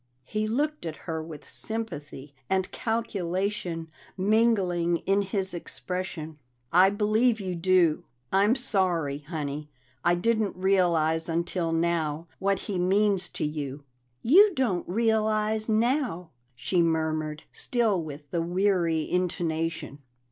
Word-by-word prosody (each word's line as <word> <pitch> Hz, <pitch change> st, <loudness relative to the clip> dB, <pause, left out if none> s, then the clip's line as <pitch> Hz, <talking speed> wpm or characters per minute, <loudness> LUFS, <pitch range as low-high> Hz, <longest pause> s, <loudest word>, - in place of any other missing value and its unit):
He 215 Hz, +5 st, -2 dB
looked 295 Hz, +7 st, -1 dB
at 155 Hz, -, -4 dB
her 160 Hz, -2 st, -3 dB
with 155 Hz, -2 st, -10 dB
sympathy 150 Hz, -11 st, -5 dB, 0.2 s
and 190 Hz, -1 st, 0 dB
calculation 195 Hz, -5 st, -2 dB, 0.3 s
mingling 190 Hz, -5 st, +2 dB
in 195 Hz, +1 st, +3 dB
his 195 Hz, -1 st, -1 dB
expression. 175 Hz, -3 st, -5 dB, 0.3 s
"I 185 Hz, +3 st, +7 dB
believe 215 Hz, +3 st, +2 dB
you 190 Hz, -2 st, -3 dB
do. 175 Hz, -2 st, +2 dB, 0.3 s
I'm 200 Hz, +5 st, +4 dB
sorry, 180 Hz, -, +1 dB
Honey; 150 Hz, -1 st, -5 dB, 0.3 s
I 175 Hz, +1 st, +4 dB
didn't 220 Hz, +2 st, 0 dB
realize 170 Hz, -4 st, +2 dB
until 170 Hz, 0 st, -1 dB
now 165 Hz, -2 st, 0 dB
what 195 Hz, 0 st, +1 dB
he 195 Hz, -3 st, -2 dB
means 195 Hz, +1 st, +2 dB
to -, -, -3 dB
you." 145 Hz, -2 st, -4 dB, 0.4 s
"You 380 Hz, -, +6 dB
don't 210 Hz, -, 0 dB
realize 215 Hz, +1 st, +1 dB
now," 225 Hz, -, 0 dB, 0.2 s
she 175 Hz, +9 st, +1 dB
murmured, 155 Hz, -2 st, -1 dB
still 225 Hz, -7 st, +1 dB
with 145 Hz, -2 st, -9 dB
the 170 Hz, -, 0 dB
weary 175 Hz, -2 st, +1 dB
intonation. 165 Hz, -4 st, -2 dB
180 Hz, 120 wpm, -27 LUFS, 160-215 Hz, 0.4 s, I